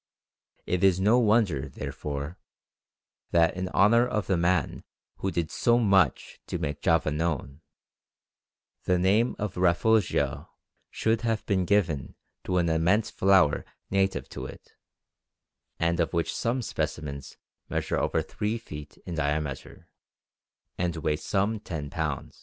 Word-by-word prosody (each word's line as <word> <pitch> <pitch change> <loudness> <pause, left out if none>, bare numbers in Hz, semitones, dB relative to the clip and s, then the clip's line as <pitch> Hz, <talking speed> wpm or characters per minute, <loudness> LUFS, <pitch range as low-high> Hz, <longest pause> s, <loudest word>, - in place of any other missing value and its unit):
It 90 0 -1
is 95 -2 +4
no 110 +6 +4
wonder, 105 - +2
therefore, 70 +4 -5 0.9
that 85 0 +3
in 90 0 -3
honour 115 +6 +4
of 105 -5 -1
the 95 - +1
man 85 +2 0 0.3
who 95 - -2
did 85 -3 -2
so 120 0 +3
much 100 -5 +2
to - - -3
make 75 -3 -4
Java 80 -2 +2
known, 75 -2 -2 1.2
the 90 - +3
name 100 +7 +2
of 105 -3 -4
Rafflesia 95 +4 +2 0.4
should 110 0 0
have 115 -2 -1
been 95 -3 +1
given 85 -9 0 0.3
to 90 - 0
an 85 -1 +2
immense 85 +7 +2
flower 95 -6 +3 0.3
native 95 0 +1
to 65 - -6
it, - - -13 1.1
and 85 0 0
of 85 - 0
which 85 -1 -1
some 120 +2 -1
specimens 70 -8 -4 0.3
measure - - -1
over - - 0
three 105 +2 -3
feet 75 -10 -10
in 90 - -5
diameter, 75 -2 -3 0.9
and 90 -1 0
weigh 75 -1 0
some 100 +6 -1
ten 75 -8 -6
pounds. - - -4
90 Hz, 135 wpm, -27 LUFS, 80-105 Hz, 1.2 s, is